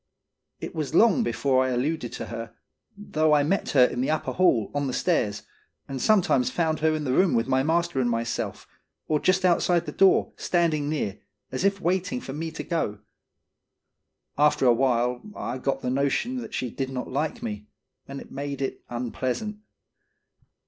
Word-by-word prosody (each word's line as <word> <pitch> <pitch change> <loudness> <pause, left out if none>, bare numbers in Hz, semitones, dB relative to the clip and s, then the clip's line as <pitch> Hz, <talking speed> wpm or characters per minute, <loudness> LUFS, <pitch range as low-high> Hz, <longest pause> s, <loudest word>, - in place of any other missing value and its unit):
It - - -6
was 155 -2 -3
long 230 +5 +5
before 135 - +1
I 130 - 0
alluded 130 +1 -1
to - - -5
her, 115 0 -7 0.4
though 155 -6 +2
I 145 - +3
met 190 +7 0
her 130 -3 +7
in 125 - -2
the 135 - 0
upper 155 - -1
hall, 125 - +2
on 145 -1 -1
the 130 - -3
stairs, 105 - 0 0.4
and 135 -2 -5
sometimes 180 - +3
found 160 -2 0
her 155 0 +2
in 155 - -3
the 130 -3 0
room 185 +1 +3
with 115 +1 +1
my 130 0 +2
master 165 -1 +1
and 120 - +1
myself, 115 0 -3 0.4
or 155 -1 +1
just 185 +3 +2
outside 175 -1 +3
the - - -5
door, 195 -1 +3
standing 160 -5 +1
near, 110 -10 -2 0.3
as 130 - -3
if 200 0 +2
waiting 185 +7 0
for 135 - -7
me 160 +3 -4
to 160 - -6
go. 160 - -2 1.4
After 150 -2 +4
a 120 - +6
while, 125 0 +1
I 125 +2 -4
got 135 +1 -2
the 125 - -1
notion 140 - 0
that 245 - -6
she 125 -3 -2
did 135 +2 -3
not 130 -1 -4
like 145 +4 -2
me, 105 -2 -5 0.4
and 140 0 -6
it - - -12
made 140 0 -4
it 135 - -4
unpleasant. 125 - -3
145 Hz, 185 wpm, -26 LUFS, 125-170 Hz, 1.4 s, her